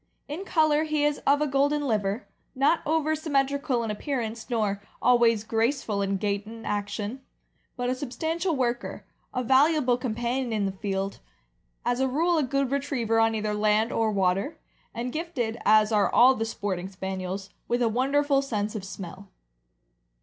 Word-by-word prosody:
In 320 +7 -5
color 310 -3 +3
he 305 -1 0
is 295 -1 +1
of 285 +1 +4
a 300 - +2
golden 285 +2 +1
liver, 210 0 -1 0.3
not 280 +5 +3
over 315 0 +1
symmetrical 280 -4 0
in 225 - -2
appearance, 230 -1 -4
nor 210 -4 0 0.2
always 235 -3 +4
graceful 225 -1 0
in 195 0 0
gait 200 +1 -2
and 225 +1 -9
action, 205 +4 -3 0.6
but 245 0 -1
a 250 - +1
substantial 320 +7 -2
worker, 240 -2 -2 0.3
a 255 - -2
valuable 265 0 +4
com 250 -4 -2
panion 240 +1 -1
in 210 -2 0
the 195 - -1
field, 195 0 -3 0.7
as 245 +1 +1
a 265 - +2
rule 325 +6 +2
a - - +3
good 275 -1 0
retriever 270 -5 0
on 225 0 +3
either 215 -1 -1
land 215 +2 +2
or 225 -1 +1
water, 195 - 0 0.3
and 245 +2 -4
gifted, 265 -9 -3
as 215 +1 +5
are 210 -2 +3
all 255 +2 +7
the 225 -3 -2
sporting 190 -4 -3
Spaniels, 190 0 -5 0.2
with 240 +1 +1
a - - +3
wonderful 275 +4 +2
sense 215 -6 -2
of 215 -4 -5
smell. 195 0 -8
240 Hz, 165 wpm, -26 LUFS, 210-280 Hz, 0.7 s, all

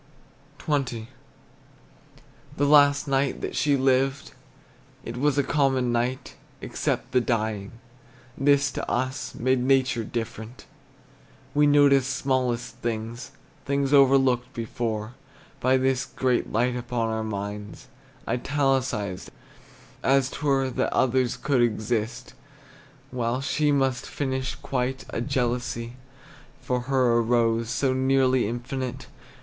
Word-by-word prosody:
XX. 130 -7 -2 1.5
The 145 - +2
last 145 0 +5
night 135 0 0
that - - -4
she 145 -2 +2
lived, 135 +1 +1 0.7
It 115 - -6
was 145 +2 +1
a 140 - +3
common 135 -4 +1
night, 120 +2 -2 0.2
Except - - -3
the 125 +1 +3
dying; 110 -4 -2 0.6
this 140 0 +3
to - - -5
us 130 +2 -2
Made 130 +2 +1
nature 130 -2 +2
different. 115 +1 -6 0.9
We 150 0 +4
noticed 140 -2 +4
smallest 125 -3 -1
things, 115 +1 -4 0.3
Things 140 0 0
overlooked 135 -3 +4
before, 115 -1 -3 0.5
By 130 +1 +3
this 130 0 0
great 130 -2 -1
light 120 +3 +1
upon 120 -2 -2
our 110 0 -2
minds 105 -1 -6 0.4
Italicized, 130 -6 -1 0.7
as 135 -1 +2
't - - -7
were. 135 -3 +1
That - - -1
others 130 -1 +1
could 135 -4 +1
exist 110 0 -1 0.8
While 125 0 -1
she 150 +2 +1
must 135 -3 0
finish 130 -2 -3
quite, 130 0 -3
A - - -2
jealousy 120 -3 -2 0.7
for 125 0 -1
her 125 -3 +3
arose 115 -1 +1
So 130 +1 +1
nearly 130 -2 +2
infinite. 125 +2 -4
130 Hz, 115 wpm, -25 LUFS, 120-135 Hz, 1.5 s, last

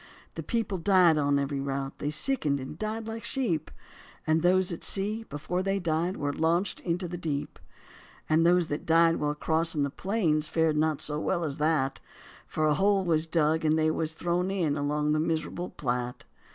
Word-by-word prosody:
The - - -5
people 220 -6 -2
died 175 -3 +4
on 140 -1 +2
every 140 0 -1
route, 135 0 -4
they 145 - -2
sickened 150 - 0
and 130 +3 -7
died 215 +4 -4
like 225 0 -5
sheep; 215 - -1 0.6
And 160 +1 +2
those 180 +1 +3
at 170 - -5
sea 210 +3 -1
before 180 +2 -3
they 195 +1 0
died 170 +1 -1
were 145 -1 -2
launched 170 +5 0
into 180 +1 -2
the 175 0 -6
deep; 145 -4 -4 0.7
And 160 +1 +3
those 175 0 +4
that 145 - -4
died 165 0 +4
while 150 0 -1
crossing 160 0 0
the 140 - -1
plains 165 -7 0
fared 160 -1 +1
not 155 -1 +1
so 150 0 -1
well 175 +2 -1
as 145 -3 -3
that, 150 -3 +1 0.5
For 155 - -1
a 150 - +4
hole 195 +3 +2
was 160 -1 +1
dug 160 -1 +1
and 155 0 +3
they 155 0 +2 0.2
thrown 175 +3 -1
in 175 -7 0
along 150 +1 0
the 155 - +2
miserable 165 +2 -2
Platte. 125 -2 -3
160 Hz, 185 wpm, -28 LUFS, 150-180 Hz, 0.7 s, died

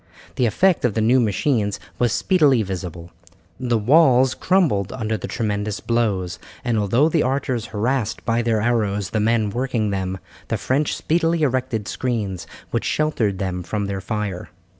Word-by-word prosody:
The 125 - +2
effect 185 - +2
of 125 -5 +1
the 110 - +1
new 120 +4 +4
machines 105 -1 0 0.2
was 120 -2 +2
speedily 145 - +3
visible. 90 -3 -6 0.5
The 120 -3 +1
walls 130 +1 +4
crumbled 160 - +1
under 110 -2 -2
the 100 - -5
tremendous 105 -2 -2
blows, 100 -7 -1 0.3
and 120 -2 +1
although 115 +9 +3
the 165 -1 +2
archers 130 -3 -1
harassed 115 +1 -2
by 115 0 +1
their 115 -2 +1
arrows 105 -5 0
the 110 - 0
men 110 -1 +1
working 120 -3 -1
them, 95 -1 -2 0.3
the - - -1
French 140 +3 0
speedily 165 0 +1
erected 130 -6 -1
screens 105 -8 -3 0.2
which - - -1
sheltered 115 -10 0
them 95 -2 -3
from 105 +3 -3
their 100 -1 -3
fire. 100 -2 -4
115 Hz, 160 wpm, -22 LUFS, 100-130 Hz, 0.5 s, new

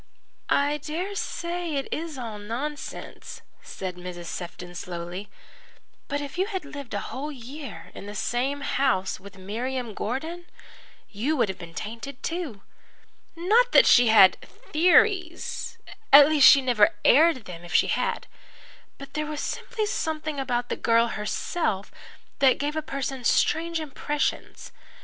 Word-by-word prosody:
"I 290 +1 +2
dare 330 +7 -4
say 345 -4 -3
it 275 - -2
is 320 -2 -4
all 225 -4 -6
nonsense," 255 +8 -6 0.2
said 185 -2 -6
Mrs. 175 -1 -7
Sefton 175 +1 -7
slowly, 175 +3 -6 0.8
"but 285 +1 -2
if 285 +5 -6
you 380 - +2
had 380 -7 -4
lived 280 -6 -7
a - - 0
whole 290 +4 -4
year 275 +2 -9
in 200 - -9
the 205 - -7
same 265 +6 -1
house 260 -11 0
with 200 +1 -13
Miriam 235 +5 -4
Gordon, 320 - -4 0.6
you 260 +10 -1
would 230 -5 +2
have 190 - -5
been 170 -2 -10
tainted 235 +5 -7
too. 325 - -4 0.7
Not 440 +9 +3
that - - +8
she 245 -1 +6
had 215 -4 +7
'theories' 350 +2 +1 0.3
at 285 0 +10
least, 300 -3 +7
she 275 -2 +6
never 235 -6 +4
aired 300 -3 +5
them 175 -2 -9
if 175 - -10
she - - +5
had. 470 -1 -1 0.7
But 275 - -11
there 305 0 -2
was 300 -1 -4
simply 440 +6 -3
something 310 -6 -2
about 245 -2 -1
the - - -2
girl 230 0 +3
herself 210 - -2 0.5
that 265 -2 +5
gave 295 +2 -2
a 315 - 0
person 270 -3 -4
strange 330 +7 +2
impressions. 295 -1 -3
275 Hz, 145 wpm, -26 LUFS, 215-315 Hz, 0.8 s, at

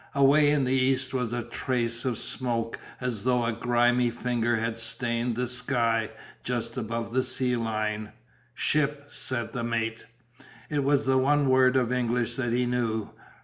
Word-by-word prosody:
Away 140 +2 +5
in 145 -2 +2
the 130 - +1
east 130 0 +1
was 125 -3 -1
a 120 0 -2
trace 120 -1 -2
of 125 -4 0
smoke 115 -3 -2 0.2
as 125 -5 -3
though 125 -1 +2
a 115 - 0
grimy 120 +1 +2
finger 120 0 0
had 115 0 -1
stained 115 +1 -1
the 125 +1 -1
sky 120 -3 0 0.3
just 120 +1 -2
above 115 -1 -4
the 130 - +3
sea 130 -1 +2
line. 110 -2 -2 0.4
"Ship," 145 -1 0
said 120 -3 -2
the 125 -3 -3
mate. 115 -1 -2 0.6
It 145 -2 +1
was 140 0 +2
the 130 0 +3
one 145 +1 +3
word 130 0 +5
of 125 -2 +1
English 120 -1 0
that 120 -3 -2
he 125 +1 +1
knew. 115 -3 -1
120 Hz, 165 wpm, -27 LUFS, 115-130 Hz, 0.6 s, Away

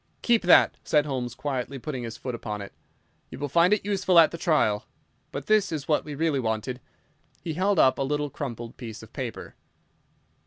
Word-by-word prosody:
"Keep 235 -2 +4
that," 180 - +5
said 150 -1 +2
Holmes, 125 -4 -3
quietly 135 -1 -3
putting 130 -1 -5
his 115 -1 -6
foot 125 - -5
upon 105 -3 -5
it; 100 -1 -8 0.6
"you - - -9
will 145 +2 -3
find 170 +6 +4
it 210 -2 +2
useful 190 -3 +2
at 165 -2 +7
the 170 - -5
trial. 130 - +1 0.4
But - - -5
this 215 -4 +3
is 150 -4 -4
what 150 - +2
we 150 -1 -7
really 155 -2 +1
wanted." 115 +2 -2 0.6
He 165 - -3
held 190 +4 +1
up 130 -2 +4
a - - 0
little 145 +1 -1
crumpled 120 -5 -6
piece 115 -4 -8
of - - -15
paper. - - -6
145 Hz, 195 wpm, -26 LUFS, 125-170 Hz, 0.6 s, at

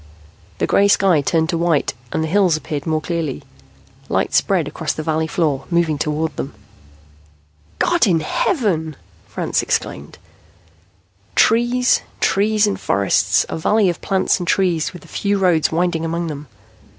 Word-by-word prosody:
The - - 0
gray 200 - +3
sky 190 -6 +3
turned 160 +2 0
to 170 -2 -1
white 165 -5 +1 0.2
and 160 - -1
the - - -2
hills 180 -2 +3
appeared 150 -2 -5
more 155 -1 0
clearly. 165 -4 -3 0.7
Light - - 0
spread - - +2
across - - -3
the 155 - -5
valley 160 0 -1
floor, 150 -4 -1
moving 170 -4 +1
toward 155 +1 -2
them. 135 - -5 1.2
"God 345 -8 +2
in 165 -4 +2
heaven!" 160 - -1 0.3
Franks - - -1
exclaimed. - - -3 1.2
Trees, 240 +2 +3 0.2
trees 210 +2 +2
and 205 - -2
forests. 100 0 +1
A - - -5
valley 210 +4 +2
of 170 - -10
plants 190 0 +1
and 175 - -5
trees, 175 -5 +1
with 180 - -12
a - - -16
few 200 0 -1
roads 180 -5 +2
winding 170 0 0
among 165 +1 -2
them. 150 -2 -6
165 Hz, 150 wpm, -19 LUFS, 155-195 Hz, 1.2 s, gray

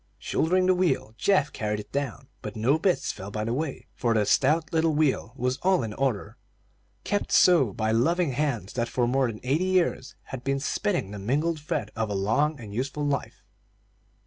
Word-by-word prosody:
Shouldering 185 +3 +1
the 185 - +5
wheel, 170 -11 0
Geoff 170 -7 +2
carried 105 -3 -2
it 105 - -10
down; 135 -1 -3
but - - -6
no 125 +8 +2
bits 180 0 +1
fell 95 0 -8
by 105 +1 -3
the 115 +2 -1
way, 145 +1 -3
for 115 -2 0
the 105 -1 +3
stout 155 +10 +2
little 160 -1 +2
wheel 150 -6 +1
was 125 0 -1
all 185 -5 +2
in 110 -2 -4
order, 125 -5 -2 0.7
kept 205 - -1
so 165 - +5
by 110 +3 -1
loving 160 +8 +2
hands 125 -8 -2
that 120 -2 -1
for 125 - +1
more 130 +1 +2
than 110 -2 -6
eighty 145 +8 +1
years 185 -8 0
had 130 -2 -8
been 135 0 0
spinning 175 - -1
the 105 - -6
mingled 150 +10 0
thread 150 - -3
of 110 -1 -1
a 100 - -2
long 130 +10 +1
and 105 -4 -9
useful 140 +5 -2
life. 145 -1 -3
135 Hz, 195 wpm, -26 LUFS, 110-160 Hz, 0.7 s, the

